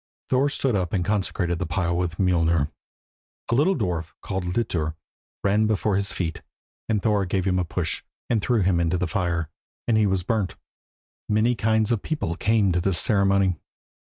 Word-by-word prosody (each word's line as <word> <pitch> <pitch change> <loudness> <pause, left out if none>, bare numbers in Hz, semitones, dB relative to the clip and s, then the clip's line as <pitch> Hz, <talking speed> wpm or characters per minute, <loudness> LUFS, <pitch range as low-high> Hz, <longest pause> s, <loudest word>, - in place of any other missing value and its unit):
Thor 135 +2 +3
stood 135 -4 0
up 90 -3 -1
and 90 -3 +1
consecrated 95 -4 0
the 90 - -2
pile 85 -1 0
with 85 -1 -1
Mjolnir. 85 -5 +2 0.8
A - - +3
little 155 +10 +3
dwarf, 85 - -2
called 95 -2 -3
Litur, 90 -5 -1 0.5
ran 105 +2 +3
before 105 -1 +1
his 100 0 0
feet, 80 -3 -3 0.5
and 105 -3 +1
Thor 105 -3 +2
gave 95 0 -1
him 90 -1 +2
a - - +1
push, 85 0 -3 0.3
and 115 -3 +1
threw 120 0 +2
him 90 -2 +2
into 85 +1 +1
the 90 - 0
fire, 85 -2 -1 0.4
and 115 - +3
he 110 -1 +4
was 95 -2 0
burnt. 105 0 -1 0.7
Many 110 +3 +3
kinds 110 -1 +1
of 115 - +1
people 100 - -2
came 105 0 +2
to 90 0 +1
this 95 -1 +1
ceremony. 100 -3 +2
95 Hz, 180 wpm, -24 LUFS, 85-110 Hz, 0.8 s, he